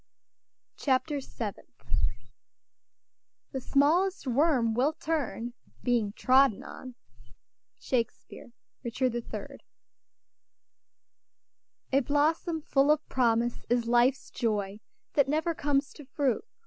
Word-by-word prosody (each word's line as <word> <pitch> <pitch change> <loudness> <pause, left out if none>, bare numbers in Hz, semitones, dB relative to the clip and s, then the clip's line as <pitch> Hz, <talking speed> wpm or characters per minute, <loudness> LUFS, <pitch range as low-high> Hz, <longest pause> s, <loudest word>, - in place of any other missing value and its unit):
CHAPTER 280 +1 +1
SEVENTH 215 -6 -7 1.7
"The 265 - -4
smallest 330 +9 +2
worm 255 -3 +2
will 265 +7 +2
turn, 290 -7 -3 0.3
being 235 -5 +1
trodden 260 -3 +4
on." 255 -2 -9 0.8
SHAKESPEARE, 240 -1 -3 0.3
Richard 250 +1 0
III. 240 -1 -6 2.3
"A 275 - +6
blossom 310 +4 +1
full 275 0 +3
of 305 0 +3
promise 235 -1 +1
is 240 -1 +2
life's 240 +3 +2
joy, 210 -3 -1 0.3
That 280 -2 +3
never 320 +3 +1
comes 285 -2 0
to 295 - -12
fruit. 270 - 0
265 Hz, 95 wpm, -29 LUFS, 240-295 Hz, 2.3 s, A